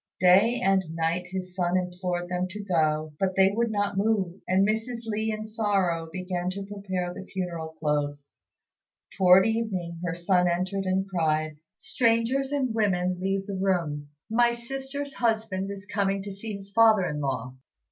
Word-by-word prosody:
Day 195 +7 +5
and 195 -5 +3
night 165 +2 -1
his 185 0 -5
son 180 0 +1
implored 180 -1 -2
them 180 0 -1
to 205 +3 -7
go, 155 -4 +1
but 190 -1 0
they 190 0 +5
would 235 +2 +1
not 205 -2 -1
move; 200 -4 0
and 190 +2 +3
Mrs. 225 +2 -2
Li 220 0 -1
in 215 0 -4
sorrow 195 -7 0
began 180 0 -3
to 195 +1 -5
prepare 190 -3 -4
the - - -8
funeral 170 -4 -4
clothes. 145 -2 -2 0.8
Towards 185 0 +6
evening 195 -7 -2
her 165 -2 -2
son 180 +1 +2
entered 185 +3 -1
and 190 +1 0
cried 155 -4 0
out, 150 - -20 0.2
"Strangers 235 +5 +1
and 265 -5 0
women, 185 -4 +1
leave 195 +1 -1
the 200 - -5
room! 170 -7 -1 0.2
My 235 +1 +3
sister's 270 +4 -5
husband 220 -5 0
is 200 0 -7
coming 200 -1 0
to 200 - -6
see 210 +3 -6
his 200 0 -8
father 220 -3 +5
in 150 - -3
law." 130 -3 -2
190 Hz, 165 wpm, -27 LUFS, 175-215 Hz, 0.8 s, Towards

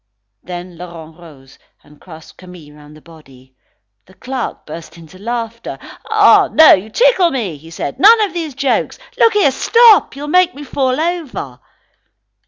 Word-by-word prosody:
Then 175 -1 -9
Laurent 165 -3 -11
rose 140 -6 -17 0.2
and 150 0 -21
grasped 160 -3 -15
Camille 180 -5 -14
round 150 0 -16
the - - -19
body. 135 -6 -19 0.5
The 190 - -21
clerk 255 +5 -6
burst 165 +2 -11
into 165 +2 -16
laughter. 230 +1 -6 0.3
"Ah, - - +4
no, 315 0 +7
you 195 +4 -1
tickle 475 - +2
me," 175 - -6
said 155 -3 -6
he, - - -11
"none 445 +4 +7
of 410 -3 -1
those 320 -6 -5
jokes. 275 -1 -1 0.2
Look 455 0 +4
here, 400 -10 +2
stop; 460 - +4
you'll 290 +1 -7
make 365 +3 +2
me 290 - -9
fall 265 -1 -2
over." 315 - -4
200 Hz, 160 wpm, -15 LUFS, -, 0.5 s, no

